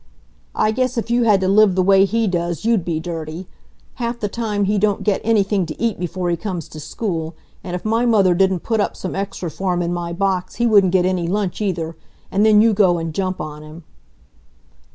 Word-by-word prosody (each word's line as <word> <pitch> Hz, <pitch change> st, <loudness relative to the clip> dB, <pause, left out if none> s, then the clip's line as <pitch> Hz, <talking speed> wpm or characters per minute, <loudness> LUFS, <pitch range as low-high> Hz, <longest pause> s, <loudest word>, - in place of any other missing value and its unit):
"I 215 Hz, -, +2 dB
guess 255 Hz, +2 st, -1 dB
if 230 Hz, +1 st, -2 dB
you 240 Hz, 0 st, +2 dB
had 205 Hz, -4 st, +4 dB
to 190 Hz, -, +1 dB
live 200 Hz, -1 st, +4 dB
the 185 Hz, -, +2 dB
way 195 Hz, +1 st, +5 dB
he 225 Hz, +4 st, 0 dB
does 175 Hz, 0 st, -2 dB
you'd 225 Hz, -5 st, +2 dB
be 165 Hz, -2 st, -2 dB
dirty! 165 Hz, +1 st, -6 dB, 0.5 s
Half 235 Hz, 0 st, -2 dB
the 210 Hz, -, -1 dB
time 210 Hz, -2 st, -2 dB
he 205 Hz, +1 st, +1 dB
don't 205 Hz, -1 st, +1 dB
get 205 Hz, -3 st, +1 dB
anything 205 Hz, -3 st, +2 dB
to 155 Hz, -, -8 dB
eat 230 Hz, -5 st, -1 dB
before 180 Hz, 0 st, -2 dB
he -, -, +1 dB
comes 175 Hz, -3 st, -5 dB
to 155 Hz, -, -10 dB
school, 165 Hz, -1 st, -4 dB, 0.3 s
and 180 Hz, -1 st, -5 dB
if 180 Hz, -, -7 dB
my 225 Hz, +3 st, +1 dB
mother 200 Hz, -6 st, +4 dB
didn't 190 Hz, -1 st, +1 dB
put 225 Hz, -2 st, -1 dB
up 205 Hz, -, -1 dB
some 185 Hz, -, -5 dB
extra 195 Hz, -3 st, -4 dB
for 180 Hz, +3 st, -2 dB
him 175 Hz, -, -1 dB
in 170 Hz, +1 st, -2 dB
my 175 Hz, -1 st, -4 dB
box 185 Hz, 0 st, -1 dB
he 240 Hz, -, 0 dB
wouldn't 200 Hz, -5 st, +4 dB
get 180 Hz, -1 st, +3 dB
any 185 Hz, -2 st, 0 dB
lunch 195 Hz, +1 st, -2 dB
either. 170 Hz, -5 st, -2 dB, 0.4 s
And 200 Hz, +2 st, +2 dB
then 215 Hz, -1 st, +6 dB
you 225 Hz, 0 st, +4 dB
go 190 Hz, -4 st, +3 dB
and 165 Hz, -1 st, -4 dB
jump 185 Hz, +1 st, -2 dB
on 150 Hz, 0 st, -6 dB
him!" 155 Hz, +2 st, -12 dB
190 Hz, 225 wpm, -20 LUFS, 175-215 Hz, 0.5 s, then